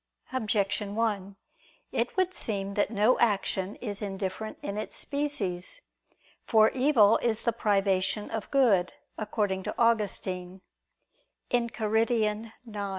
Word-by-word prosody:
Objection 205 -4 0
1: 205 -4 -1 0.6
It - - -1
would 370 0 +2
seem 200 - -1
that 205 0 +1
no 215 +3 +3
action 200 -3 +1
is 205 -4 -5
indifferent 195 +1 -4
in 200 - -3
its 215 - -4
species. 280 - -2 0.6
For 220 -1 +5
evil 250 -6 +5
is 225 -2 0
the 235 - +1
privation 195 -1 +1
of 220 -2 -4
good, 220 -10 +3 0.3
according 205 -3 -1
to - - -5
Augustine 190 -5 0 0.9
(Enchiridion 225 -2 +1
xi). 215 -3 -7
210 Hz, 115 wpm, -28 LUFS, 195-230 Hz, 0.9 s, For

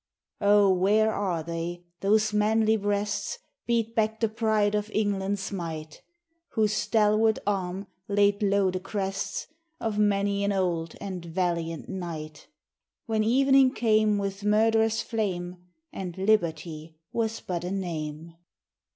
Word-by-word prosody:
O! 205 -1 +5
where 210 +4 +3
are 180 -5 -1
they, 170 +1 -4 0.2
whose 215 +2 +3
manly 220 +1 +3
breasts 205 0 -1 0.3
Beat 230 -1 +1
back 220 0 0
the 225 - +1
pride 215 -2 +1
of 210 0 -1
England's 200 -1 -1
might; 160 -5 -6 0.5
Whose 215 -2 +2
stalwart 215 +1 +3
arm 190 -1 -2 0.2
laid 205 0 +2
low 200 -2 +2
the 185 - -3
crests 195 0 -3 0.3
Of 215 -2 -2
many 200 -1 +2
an 200 - +1
old 175 -4 -1
and 185 -3 -5
valiant 170 -2 -2
knight; 160 -5 -6 0.6
When 220 -1 +1
evening 270 +3 +4
came 215 -2 +3
with 200 0 -3
murderous 220 +1 +3
flame, 185 -6 -3 0.4
And 180 -2 -6
liberty 165 -5 0 0.2
was 225 -1 -1
but 175 -2 -4
a 180 - -3
name? 165 -4 -4
200 Hz, 125 wpm, -27 LUFS, 180-215 Hz, 0.6 s, O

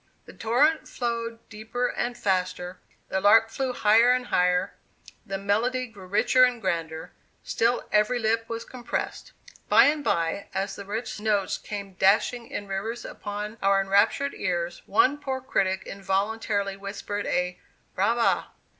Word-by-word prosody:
The - - -12
torrent 275 +8 +2
flowed 230 -1 -4
deeper 225 +4 -3
and 240 0 -3
faster, 185 -3 -1 0.3
the 190 - -1
lark 225 +3 +6
flew 260 +2 -2
higher 230 +1 +5
and 250 0 -1
higher, 180 -4 +1 0.5
the 195 -1 -3
melody 225 +6 0
grew 205 -6 -13
richer 245 +6 +4
and 250 -1 +3
grander; 165 -5 -3 0.3
still 235 +2 0
every 210 +4 +3
lip 225 0 0
was 230 0 -4
compressed. 245 -2 -5 0.4
By - - +7
and 295 0 +2
by, 180 -4 0
as 195 +1 -2
the 200 - -8
rich 215 +2 -4
notes 210 -3 0
came 200 -2 -7
dashing 215 +5 +2
in 205 - -5
rivers 215 +5 -4
upon 210 +2 -6
our 195 0 +4
enraptured 200 +8 +2
ears, 175 -2 -2
one 290 -6 +3
poor 265 -2 -3
critic 190 -7 -1
involuntarily 200 +1 -1
whispered 200 +1 -5
a 180 0 -1 0.3
'brava. 230 +5 +2
210 Hz, 145 wpm, -26 LUFS, 195-240 Hz, 0.5 s, By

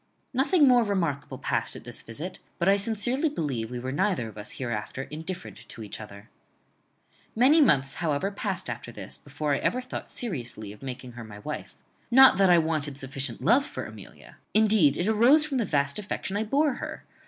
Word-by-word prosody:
Nothing 285 +4 +4
more 245 -2 +6
remarkable 150 -9 -2
passed - - -1
at - - -9
this - - -5
visit; 165 +11 -6 0.2
but 170 - 0
I 195 - +6
sincerely 225 +8 0
believe 135 - -3
we 125 - -5
were 130 +2 -4
neither 175 - 0
of 110 - -14
us 105 0 -8
hereafter 120 +1 -4
indifferent 160 +6 -7
to 115 - -7
each 105 +1 -7
other. 100 -1 -11 1.1
"Many 270 +8 +6
months, 135 - +4
however, 160 +4 -1
passed 200 -2 -3
after 120 0 -5
this, 105 -3 -6
before 145 +1 -2
I 140 - +1
ever 250 - 0
thought 255 - -7
seriously 120 - -5
of 105 - -17
making 130 -1 -7
her 120 -1 -9
my 105 -2 -10
wife. 105 - -6 0.3
Not 265 +2 +8
that 195 -1 +5
I 175 - +7
wanted 155 -4 -1
sufficient 135 -2 -4
love 245 +6 +5
for - - -6
Amelia. - - -12 0.2
Indeed 210 -9 +5
it 175 - 0
arose 240 +8 +5
from 275 -4 -1
the 230 - +1
vast 140 -1 +1
affection 200 -1 -4
I 215 +2 0
bore 285 +5 +2
her. - - -6
165 Hz, 190 wpm, -27 LUFS, 130-220 Hz, 1.1 s, Not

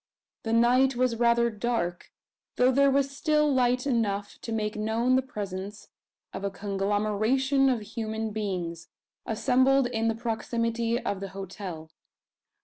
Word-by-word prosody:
The 225 - -3
night 250 +3 +4
was 250 -1 +1
rather 235 0 +3
dark, 210 -6 -2 0.5
though 250 +1 +4
there 280 +2 +4
was 275 0 +1
still 300 0 +2
light 250 0 +2
enough 205 -6 -1
to 230 - -6
make 215 -1 -2
known 225 +4 +1
the 260 - +3
presence 205 -4 -7 0.4
of - - -6
a 200 - 0
conglomeration 210 +7 +1
of 245 -4 0
human 220 +1 -4
beings, 180 -6 -4 0.4
assembled 260 +4 +3
in 225 -2 -1
the 225 - +1
proximity 230 0 -1
of 200 -6 -3
the 195 0 -6
hotel. 185 -4 -7
230 Hz, 140 wpm, -27 LUFS, 205-255 Hz, 0.5 s, night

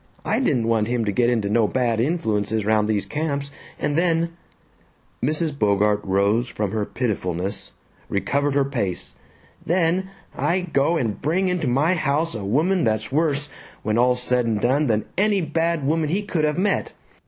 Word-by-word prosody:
I - - +1
didn't 130 - +1
want 110 -2 +2
him 120 -1 0
to 105 - 0
get 120 +4 +2
into 115 -4 0
no 110 +1 +3
bad 120 -1 0
influences 110 - 0
round 105 0 +2
these 105 -2 0
camps 140 -2 -3 0.3
and 145 - -1
then," 170 0 +2 0.9
Mrs. 155 +2 0
Bogart 105 -3 +2
rose 100 +5 +1
from 105 -4 -3
her 110 -1 -1
pitifulness, 95 -6 -2 0.4
recovered 140 +8 0
her 140 -1 +3
pace, 100 -10 -2 0.5
"then 180 +2 +1 0.3
I 170 +7 +1
go 160 -1 +1
and 115 -8 -2
bring 185 +5 +1
into 180 -5 -1
my 140 +7 +2
own 185 - +1
house 155 +2 0
a 110 -3 -5
woman 160 - +1
that's 110 -1 0
worse, 145 -1 +1 0.3
when 110 +1 +1
all's 125 0 +3
said 125 -1 +1
and 110 -2 0
done, 135 +7 +2
than 110 -2 +1
any 205 0 +3
bad 165 -1 0
woman 155 +1 +1
he 195 +6 0
could 165 -6 0
have 150 0 0
met. 195 +2 0
135 Hz, 175 wpm, -23 LUFS, 110-160 Hz, 0.9 s, no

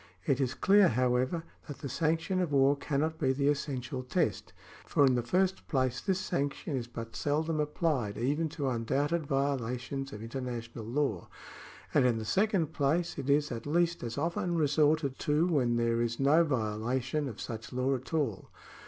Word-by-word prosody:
It 135 0 +1
is 130 0 0
clear, 200 0 +5
however, 125 +6 +1 0.2
that 145 - -7
the 145 - -4
sanction 165 +6 0
of 175 -4 -1
war 140 0 +4
cannot 150 +3 -1
be 130 -3 +2
the 140 +1 +1
essential 135 -3 -2
test; 125 - -1 0.3
for 145 - +3
in 130 - +4
the 120 - +1
first 185 +10 0
place 130 -3 0
this 190 -2 0
sanction 145 -2 -2
is 120 -2 -3
but 115 -1 -8
seldom 155 +2 0
applied 150 - -1
even 145 +8 0
to 145 -2 -3
undoubted 140 +6 0
violations 135 -1 -2
of 105 +1 -8
international 120 -2 -5
law, 120 - -1 0.7
and 125 - +5
in 120 -2 +1
the 110 - -4
second 195 - +1
place 160 +4 0
it 135 - -4
is 145 +1 +3
at 115 +2 -5
least 170 +2 +1
as 120 0 -5
often 170 +3 -1
resorted 150 -2 +2
to 150 +3 +2
when 135 -9 +2
there 115 0 +1
is 115 0 -1
no 145 +5 +5
violation 130 +2 -1
of 110 - -9
such 110 -2 -6
law 130 +2 0
at 130 0 -5
all. 145 - -1
140 Hz, 175 wpm, -30 LUFS, 125-155 Hz, 0.7 s, clear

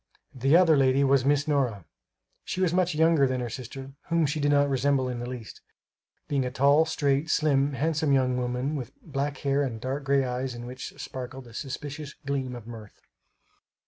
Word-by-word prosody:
The 135 +4 +4
other 170 -3 +5
lady 135 0 +3
was 135 -1 +3
Miss 145 +1 +2
Nora. 125 - 0 0.6
She - - -4
was 180 -3 +2
much 180 -2 +1
younger 160 -3 +4
than 130 0 -1
her 120 -2 -4
sister 135 +2 -7 0.2
whom 170 -1 +2
she 150 +2 -1
did 145 0 +1
not 145 0 +4
resemble 135 -1 +1
in 125 -1 -4
the 120 +1 -5
least, 120 -4 -8 0.7
being 140 -2 0
a 125 - -2
tall 140 +4 +4
straight, 150 -1 0
slim, 145 -3 +2
handsome 155 +1 0
young 130 -2 +3
woman 125 +4 -2
with 140 - -7
black 145 -4 -3
hair 140 +1 +2
and 125 -5 -2
dark 135 +4 -3
gray 135 0 +3
eyes 125 0 -3
in 120 0 -7
which 125 +1 -8
sparkled 130 0 -7
a 120 - -14
suspicious 145 +2 -6
gleam 135 -2 -2
of 120 -3 -9
mirth. 110 -3 -11
135 Hz, 190 wpm, -27 LUFS, 125-145 Hz, 0.7 s, other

